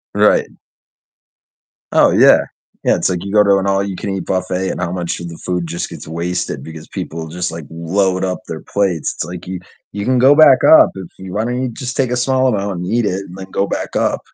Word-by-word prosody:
Right. - - +4 1.4
Oh, - - +5
yeah. - - +6 0.4
Yeah, - - +3
it's - - 0
like 90 0 -2
you 100 - -5
go 105 - +6
to 100 -1 +4
an 95 - -1
all-you-can-eat 95 -1 -2
buffet, 95 0 -1
and - - -4
how 90 -1 -2
much 90 -2 -3
of 85 - -6
the 85 - -9
food 90 -1 -3
just 85 +1 -4
gets - - -10
wasted 85 +3 -3
because 80 -1 -10
people 80 0 -6
just, 90 +1 -3
like, 80 -2 -7
load 90 +3 0
up 90 -1 -2
their - - -6
plates. 95 -6 -1
It's - - -3
like 90 0 -8
you 95 -1 -4 0.3
you 100 0 -4
can 125 +1 +2
go 135 +3 +6
back 150 -4 +7
up 160 - +8
if 95 -2 -7
you 95 -1 -9
why 110 +2 -1
don't 125 +1 -2
you 130 - -1
just 125 +1 -6
take 130 -3 0
a 125 - 0
small 130 +1 +2
amount 100 -5 -1
and 90 - -4
eat 120 -1 +1
it 95 0 -1
and 90 +1 -11
then 95 0 -9
go 100 - 0
back - - -4
up? - - +1
95 Hz, 230 wpm, -17 LUFS, 90-105 Hz, 1.4 s, up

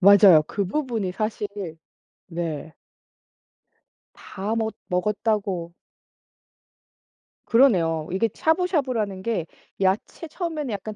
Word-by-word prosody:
맞아요. 195 -4 +8
그 200 - -2
부분이 225 -6 -2
사실 215 0 -2 0.8
네. 165 -3 -4 1.4
다 205 +4 -4
멋 220 -1 -1
먹었다고. 195 -2 -1 1.7
그러네요. 170 - +3
이게 205 +5 +1
샤브샤브라는 275 - 0
게 205 -7 -1 0.4
야채 195 - 0
처음에는 310 - -4
약간 210 +2 -5
205 Hz, 205 characters per minute, -24 LUFS, 180-230 Hz, 1.7 s, 맞아요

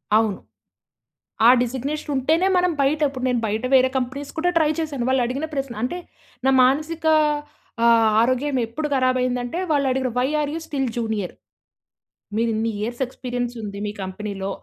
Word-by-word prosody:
అవును. 215 -3 +2 1.1
ఆ - - +9
డిజిగ్నేషన్ 265 +5 -3
ఉంటేనే 315 +8 +2
మనం 360 -1 +3
బయట 280 +3 +2
ఇప్పుడు 260 -2 -6
నేను 245 -2 +1
బయట 215 +3 -2
వేరే 260 0 +6
కంపెనీస్ 265 +3 -3
కూడా 355 +3 +2
ట్రై 315 -2 +3
చేశాను. 295 -6 -2
వాళ్ళు 260 -1 +2
అడిగిన 270 +6 -3
ప్రశ్న 270 -3 -3
అంటే 300 +9 -2 0.5
నా 265 - +5
మానసిక 310 +5 0 0.8
ఆహ్, 230 -1 +5
ఆరోగ్యం 255 +3 +1
ఎప్పుడు 300 +7 -4
కరాబయ్యిందంటే 255 +1 0
వాళ్ళు 285 -2 +2
అడిగిన, 260 0 0
"why 250 - +2
are 290 -1 -1
you - - -2
still 270 -3 -1
junior? 220 -5 -2 1.1
మీరిన్ని 225 0 0
years 240 +4 -4
experience 245 -1 -4
ఉంది 200 -2 -6
మీ 205 - -2
కంపెనీ‌లో, 195 +1 -5
255 Hz, 150 wpm, -22 LUFS, 230-285 Hz, 1.1 s, ఆ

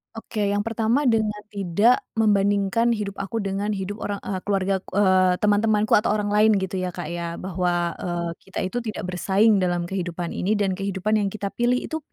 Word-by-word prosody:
Oke, 215 -2 -3
yang 205 - +1
pertama 230 +5 +1
dengan 215 -2 0
tidak 205 +4 +2
membandingkan 205 +1 +2
hidup 200 -2 -4
aku 205 +3 -3
dengan 200 +2 -2
hidup 200 +2 -4
orang, 205 -2 -4
eee, 190 - -3
keluargaku 195 -1 0
eee, 185 -2 +3
teman-temanku 210 +1 +2
atau 210 - +1
orang 210 -1 -1
lain 215 +1 +4
gitu, 190 0 -3
ya, 185 -1 -3
Kak, 150 - -6
ya, 170 -1 -4
bahwa, 175 -1 -1
eee, 175 -1 -3 0.2
kita 190 - -5
itu 190 +6 -3
tidak 220 -6 -4
bersaing 195 +4 +3
dalam 175 -2 0
kehidupan 175 -2 -3
ini 200 +4 -1
dan 200 -3 0
kehidupan 200 +2 0
yang 200 -1 -1
kita 200 -2 -3
pilih 245 +3 +1
itu 315 - -4
200 Hz, 185 wpm, -23 LUFS, 185-215 Hz, 0.2 s, lain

